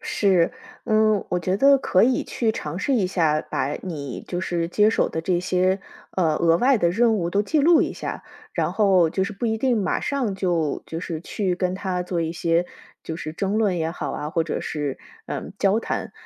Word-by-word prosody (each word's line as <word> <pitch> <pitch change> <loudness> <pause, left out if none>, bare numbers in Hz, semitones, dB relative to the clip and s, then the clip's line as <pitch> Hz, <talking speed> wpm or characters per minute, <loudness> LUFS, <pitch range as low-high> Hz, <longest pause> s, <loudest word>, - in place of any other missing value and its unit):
是， 185 -5 +2 0.3
嗯， 215 -2 +3
我 180 - 0
觉 185 +3 0
得 275 +4 +6
可 185 -7 +2
以 255 0 +2
去 225 -2 -1
尝 155 -3 -5
试 270 +6 0
一 200 -6 +2
下， 160 -4 +1
把 135 - -2
你 145 -8 -6
就 175 0 -3
是 170 -2 -1
接 210 +4 +3
手 - - +1
的 160 - -3
这 175 +1 0
些， 185 +1 +1 0.3
呃， 165 -5 +1
额 165 -1 +3
外 260 +6 +4
的 170 - +3
任 225 +3 +3
务 170 -2 -1
都 205 +2 +2
记 305 +7 +1
录 330 +3 +5
一 - - -2
下。 - - -5 0.3
然 - - -1
后 190 -6 +4
就 190 +2 0
是 210 - -4
不 220 +4 -3
一 220 0 0
定 245 -2 +2
马 185 - 0
上 255 -8 -1
就 170 -6 -1
就 165 - -5
是 165 -3 -4
去 185 0 -2
跟 185 -1 -1
他 185 -2 -2
做 180 -1 -2
一 165 0 -2
些， 170 +1 +1 0.4
就 160 - -5
是 155 -3 -6
争 200 +5 -1
论 205 -5 +2
也 160 0 -1
好 - - -4
啊， 150 +1 -4
或 165 -1 0
者 - - -3
是， 145 -3 -3 0.3
嗯， - - -5
交 200 +3 +2
谈。 - - -4
185 Hz, 235 characters per minute, -23 LUFS, 165-215 Hz, 0.4 s, 得